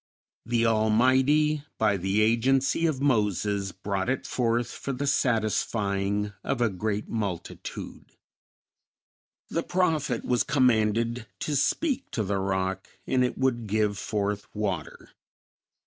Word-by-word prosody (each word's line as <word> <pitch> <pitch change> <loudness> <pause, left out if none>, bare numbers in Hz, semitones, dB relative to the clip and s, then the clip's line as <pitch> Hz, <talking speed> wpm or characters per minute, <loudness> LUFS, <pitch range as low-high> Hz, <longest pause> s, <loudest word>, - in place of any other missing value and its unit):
The 115 -1 +2
Almighty, 130 +7 +3
by 105 -2 +2
the 95 +3 +1
agency 130 +8 +2
of 140 -4 -2
Moses, 105 - +1
brought 95 +3 -3
it 130 - -1
forth 120 -1 0
for 140 - -5
the 135 +3 -3
satisfying 105 -5 0
of 135 - -1
a 120 -3 +2
great 105 +2 -2
multitude. 100 -6 -5 1.3
The - - 0
prophet 155 -9 0
was 125 -1 +2
commanded 115 -4 +2
to 150 - -1
speak 265 - 0
to 110 - 0
the 100 0 -1
rock 95 0 -1 0.2
and 130 -1 +2
it 125 - -1
would 120 -4 0
give 105 0 +1
forth 105 -1 -2
water. 100 -7 -4
110 Hz, 120 wpm, -27 LUFS, 100-130 Hz, 1.3 s, Almighty